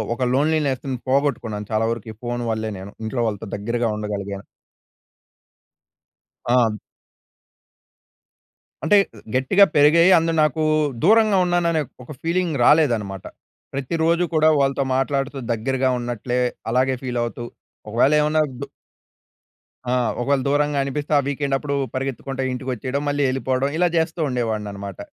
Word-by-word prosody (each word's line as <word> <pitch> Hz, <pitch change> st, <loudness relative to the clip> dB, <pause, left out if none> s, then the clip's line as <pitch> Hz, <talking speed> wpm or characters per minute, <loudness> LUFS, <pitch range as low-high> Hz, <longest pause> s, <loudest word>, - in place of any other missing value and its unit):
ఒక 130 Hz, -, -2 dB
లోన్లీనెస్‌ని 140 Hz, -3 st, 0 dB
పోగొట్టుకున్నాను 120 Hz, -7 st, 0 dB
చాలా 110 Hz, +1 st, +1 dB
వరకు 115 Hz, -1 st, -5 dB
ఈ -, -, -24 dB
ఫోన్ 120 Hz, 0 st, -3 dB
వల్లే 110 Hz, 0 st, -2 dB
నేను 95 Hz, +2 st, -9 dB
ఇంట్లో 120 Hz, +2 st, -2 dB
వాళ్ళతో 110 Hz, 0 st, -4 dB
దగ్గరగా 115 Hz, +3 st, -1 dB
ఉండగలిగేను. 100 Hz, -1 st, -5 dB, 2.0 s
ఆ! 120 Hz, -3 st, +2 dB, 2.1 s
అంటే 205 Hz, -, +5 dB, 0.4 s
గట్టిగా 185 Hz, +10 st, +5 dB
పెరిగాయి. 165 Hz, +5 st, +6 dB
అందులో 165 Hz, 0 st, 0 dB
నాకు 155 Hz, +1 st, 0 dB, 0.4 s
దూరంగా 215 Hz, 0 st, +5 dB
ఉన్నాను 175 Hz, -1 st, +1 dB
అనే 160 Hz, -, +1 dB, 0.2 s
ఒక 125 Hz, -, -14 dB
ఫీలింగ్ 170 Hz, -2 st, 0 dB
రాలేదన్నమాట. 115 Hz, -, +2 dB, 0.5 s
ప్రతి 135 Hz, +3 st, -4 dB
రోజు 170 Hz, +2 st, +2 dB
కూడా 155 Hz, 0 st, +4 dB
వాళ్ళతో 135 Hz, 0 st, +1 dB
మాట్లాడుతూ 135 Hz, +1 st, -1 dB
దగ్గరగా 130 Hz, +3 st, 0 dB
ఉన్నట్లే 120 Hz, +1 st, -2 dB, 0.3 s
అలాగే 130 Hz, +2 st, +2 dB
ఫీల్ 125 Hz, -2 st, -3 dB
అవుతూ 120 Hz, 0 st, -5 dB, 0.4 s
ఒకవేళ 120 Hz, +7 st, +3 dB
ఏమన్నా 150 Hz, +1 st, +2 dB, 0.2 s
దూ 140 Hz, -, -5 dB, 1.2 s
ఆ! 125 Hz, -, -1 dB, 0.3 s
ఒకవేళ 140 Hz, +2 st, +1 dB
దూరంగా 145 Hz, 0 st, +1 dB
అనిపిస్తే 145 Hz, +2 st, -4 dB
ఆ -, -, +4 dB
వీకెండ్ 140 Hz, -1 st, -1 dB
అప్పుడు 140 Hz, 0 st, -3 dB, 0.2 s
పరిగెత్తుకుంటే 135 Hz, 0 st, -3 dB
ఇంటికి 130 Hz, +1 st, -4 dB
వచ్చేయడం 130 Hz, +4 st, -3 dB
మళ్ళీ 145 Hz, 0 st, 0 dB
ఎళ్ళిపోవడం 130 Hz, +1 st, 0 dB
ఇలా 175 Hz, +1 st, +3 dB
చేస్తూ 160 Hz, +1 st, 0 dB
ఉండేవాడినన్నమాట. 105 Hz, -5 st, -3 dB
135 Hz, 125 wpm, -22 LUFS, 115-150 Hz, 2.1 s, పెరిగాయి